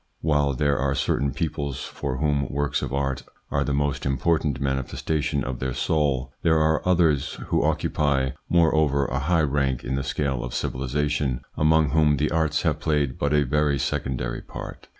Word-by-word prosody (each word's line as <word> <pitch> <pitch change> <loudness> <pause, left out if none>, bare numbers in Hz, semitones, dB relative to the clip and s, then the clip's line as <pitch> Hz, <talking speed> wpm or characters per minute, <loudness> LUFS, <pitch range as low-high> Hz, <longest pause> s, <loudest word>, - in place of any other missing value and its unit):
While 75 -3 +2
there 70 +1 +1
are 70 +1 0
certain 70 0 0
peoples 70 -3 -3
for 70 -3 -4
whom 70 -3 0
works 70 -1 -1
of - - -4
art 70 -1 -1 0.3
are 70 - +1
the 70 - -2
most 70 -1 0
important 70 +1 0
manifestation 70 +2 -1
of 65 -1 -4
their 65 -1 -2
soul, 70 -4 0
there 80 -1 +3
are 80 0 +2
others, 80 -5 +2
who - - +2
occupy, 70 -3 +1 0.2
moreover, 80 -4 +3
a 65 0 -2
high 80 +3 +2
rank 70 -3 0
in 65 - -3
the 70 - 0
scale 70 -4 -1
of 65 -1 -5
civilisation, 70 0 -1
among 75 -1 +3
whom 75 -1 +3
the 75 +2 0
arts 80 -1 +1
have 80 -4 +1
played 75 -4 0
but 70 - 0
a 75 -1 +3
very 75 +1 +1
secondary 60 -2 -2
part. - - -9
70 Hz, 170 wpm, -24 LUFS, 65-75 Hz, 0.3 s, there